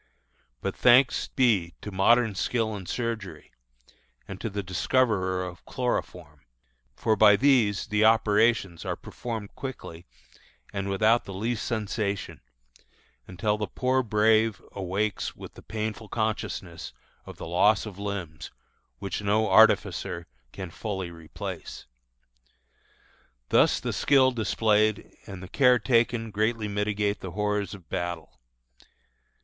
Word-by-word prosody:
But - - -3
thanks 125 +2 +4
be 105 -10 +1
to 105 - -7
modern 110 +4 +3
skill 110 +2 -1
in 95 -3 -8
surgery, 110 -9 -4 0.8
and 95 0 -8
to 115 - -2
the 100 0 -4
discoverer 95 -1 0
of 90 -1 -9
chloroform; 90 - -4 0.5
for 110 - +1
by 105 0 +7
these 115 -6 +3
the 105 0 +1
operations 110 -4 +3
are - - -2
performed 110 -4 -7
quickly 90 -10 -8 0.7
and 100 -1 -3
without 110 +4 +3
the 95 - -8
least 115 +4 -2
sensation, 105 - -3 0.9
until 105 +3 -1
the 105 - -2
poor 130 +4 0
brave 110 -1 +2
awakes 100 +2 -2
with - - -11
the - - -13
painful 110 0 -5
consciousness 105 -6 -3 0.3
of - - -10
the - - -7
loss 100 +6 +3
of 100 -3 -9
limbs, 95 -7 -5 0.5
which 100 0 -4
no 105 +2 +1
artificer 90 -5 +3 0.3
can 95 -3 -7
fully 95 -3 -5
replace. 85 -2 -8 1.6
Thus - - +4
the - - -3
skill 135 -2 +4
displayed 110 -2 +1
and 95 -1 -8
the - - -8
care 125 +4 +4
taken 115 0 +1
greatly 110 +1 0
mitigate 105 0 -1
the 90 -3 -7
horrors 105 -1 -1
of 90 -5 -16
battle. 85 -3 -5
105 Hz, 125 wpm, -27 LUFS, 95-115 Hz, 1.6 s, by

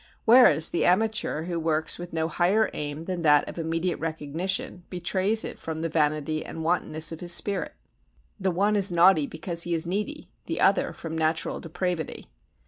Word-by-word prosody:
Whereas 230 -9 +6
the - - 0
amateur 215 -4 +1
who 170 0 -3
works 160 0 0
with 175 0 -8
no 160 -1 -1
higher 185 +7 +1
aim 150 +1 -5
than 180 0 -4
that 150 -2 +4
of - - -7
immediate 165 +2 -2
recognition 170 - -2
betrays 190 +4 0
it - - -7
from 160 -1 -5
the 165 - -2
vanity 155 0 0
and 160 - -7
wantonness 160 -2 0
of 165 - -7
his 175 -1 +2
spirit. 200 -2 0 0.6
The 190 -1 0
one 200 +4 +1
is 200 -2 +3
naughty 170 -3 +4
because 170 +1 -2
he 170 0 +1
is 165 +1 -1
needy, 210 - -4 0.2
the - - -3
other - - +3
from 165 -1 -7
natural 160 0 -1
depravity. 170 - -4
170 Hz, 175 wpm, -26 LUFS, 160-185 Hz, 0.6 s, Whereas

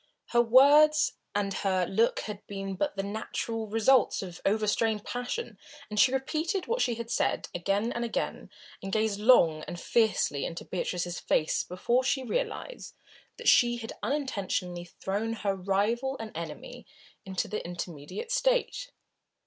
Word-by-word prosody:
Her 240 - +4
words 290 +6 +6 0.2
and 200 -1 0
her 190 -2 0
look 220 +6 +1
had 210 -2 -6
been 195 -1 -5
but 290 +8 -2
the 195 - -1
natural 220 +2 -4
results 225 +2 +3
of 175 -2 -9
overstrained 215 +1 +1
passion, 245 - -4 0.3
and 210 - -1
she 255 - +6
repeated 310 +7 -1
what 470 +2 -1
she 240 - +1
had 230 0 -6
said - - 0
again 200 +6 0
and 235 - -2
again, 235 - -3 0.3
and 195 - -5
gazed 215 -1 0
long 170 -9 +5
and 175 -1 -6
fiercely 220 -12 +1
into 170 - -5
Beatrice's 175 -1 -3
face 155 - +1
before 235 +8 0
she 270 0 0
realised - - -4 0.4
that - - -6
she 240 -1 +5
had 225 -1 -7
unintentionally 200 -9 -2
thrown 200 +6 -3
her 205 -3 -1
rival 210 +8 0
and 220 -4 -7
enemy 165 +1 -7 0.4
into 190 -1 -3
the 215 - -4
intermediate 175 - -6
state. - - +1
220 Hz, 150 wpm, -29 LUFS, 195-255 Hz, 0.4 s, words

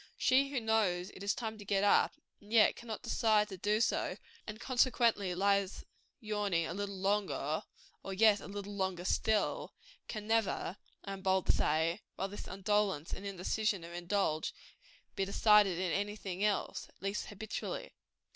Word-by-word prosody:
She 270 +2 +3
who 275 -2 -1
knows 210 -5 +1
it - - -12
is 200 +1 0
time 220 -2 -4
to - - -8
get 195 0 +1
up, 205 - +4 0.2
and 205 +1 -17
yet 225 -2 +6
cannot 225 -3 -7
decide 215 -3 +2
to 190 - -7
do 210 +3 +1
so, 235 - 0 0.3
and 215 0 -6
consequently 235 -7 +2
lies 200 0 +1 0.3
yawning 205 -7 0
a 165 - -4
little 200 0 -4
longer, 195 -6 0 0.4
"and 195 0 -6
yet 215 -2 +6
a - - -9
little 200 0 -6
longer 190 -3 -2
still," 215 +2 0 0.3
can 215 -2 -5
never, 220 -4 0 0.3
I 195 - -4
am 195 - -7
bold 190 -1 +2
to - - +5
say, 165 +5 +1
while 195 - -2
this 205 - -8
indolence 195 -4 0
and 200 - -5
indecision 195 0 -1
are 170 - -10
indulged, 175 -2 -1 0.6
be 195 - 0
decided 200 -1 +4
in 180 -1 -1
any 205 +4 -1
thing 195 -2 -4
else 210 -1 -1
at - - -27
least; 195 +1 -2
habitually. 215 +1 -5
200 Hz, 170 wpm, -33 LUFS, 190-215 Hz, 0.6 s, yet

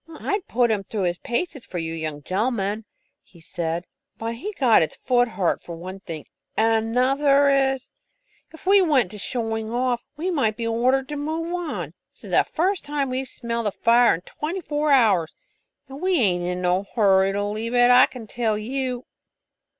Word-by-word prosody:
"I'd 400 -2 -2
put 240 -1 +2
him 205 -2 0
through 205 0 -3
his 175 -1 -1
paces 280 +2 -3
for 180 - -7
you 165 -1 -3
young 155 -3 -5
gen'lemen," 210 - -1 0.4
he 170 - -20
said, 165 +1 -3 0.3
"but 230 +1 -3
he 265 - -5
got 255 - +4
his 160 - -1
foot 245 -1 +2
hurt 185 -6 -1
for 170 - -8
one 185 +3 -8
thing, 165 -5 -8 0.3
and 225 0 +2
another 275 +4 +3
is, 270 -1 +1 0.6
if 320 - -15
we 395 +1 +6
went 275 - +2
to 210 - -8
showing 225 -1 -3
off, 245 0 0
we 355 +4 -1
might 225 -10 0
be 230 - -3
ordered 255 +4 +1
to 295 - -4
move 320 +4 -3
on. 350 -2 -4 0.2
This - - -17
is - - -9
the - - +5
first 370 +3 -1
time 285 -2 -2
we've 260 +1 -3
smelled 235 -2 -3
a - - 0
fire 235 +1 +4
in 165 - -8
twenty 325 - -5
four 300 -1 -1
hours, 210 - +3 0.5
and 270 +3 -10
we 370 -1 +2
ain't 180 - +2
in 180 0 -3
no 180 +2 +1
hurry 195 -3 +4
to 205 0 -1
leave 215 +4 -3
it, 245 0 +6
I 250 +1 +7
can 245 -3 -10
tell 220 -1 -1
you." 250 +2 -3
235 Hz, 190 wpm, -23 LUFS, 200-275 Hz, 0.6 s, I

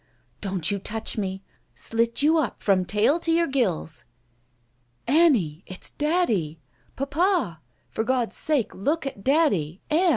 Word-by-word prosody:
"Don't 190 -3 -1
you 200 - -1
touch 220 +3 -2
me 195 -2 -3 0.2
— - - -42
slit 230 +4 0
you 320 +2 +4
up 265 -8 -3
from 190 -3 +3
tail 215 - +2
to 330 - -1
your 335 +1 +3
gills." 210 - -1 1.0
"Annie, 240 - +3
it's 185 - -6
daddy! 260 - 0 0.4
Papa! 285 - 0 0.3
For 220 - -1
God's 245 -1 0
sake 295 -9 0
look 290 - -1
at 230 -8 -6
daddy 205 - +2
— - - -37
Ann! 350 +4 +4
230 Hz, 150 wpm, -25 LUFS, 190-310 Hz, 1.0 s, you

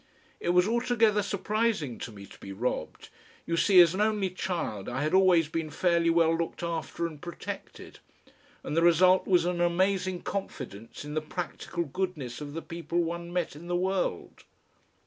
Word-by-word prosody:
It - - -2
was 180 +2 +4
altogether 230 -2 +2
surprising 200 - -1
to 115 - -6
me 100 -2 -11
to - - -15
be 95 - -9
robbed. 105 -4 -3 0.4
You 170 - -1
see, 185 +2 +5
as 170 -1 +5
an 195 - -1
only 210 -3 +1
child 170 - -3
I 130 +4 -2
had 155 - -1
always 185 -4 +5
been 160 0 -3
fairly 170 0 +2
well 165 -1 +4
looked 170 +1 -3
after 170 0 -3
and 155 -3 -6
protected, 175 -1 -8 0.6
and - - -4
the 165 - +3
result 180 +2 +5
was 180 -3 +4
an 175 -1 -1
amazing 185 +1 +1
confidence 130 - -6
in 150 - -6
the 155 - 0
practical 170 +1 -4
goodness 150 -6 -4
of 145 -1 -6
the 165 - -5
people 170 +1 -2
one 170 +1 -4
met 175 -4 -2
in 165 +4 -10
the 175 - -1
world. 185 - -2
170 Hz, 175 wpm, -28 LUFS, 155-185 Hz, 0.6 s, see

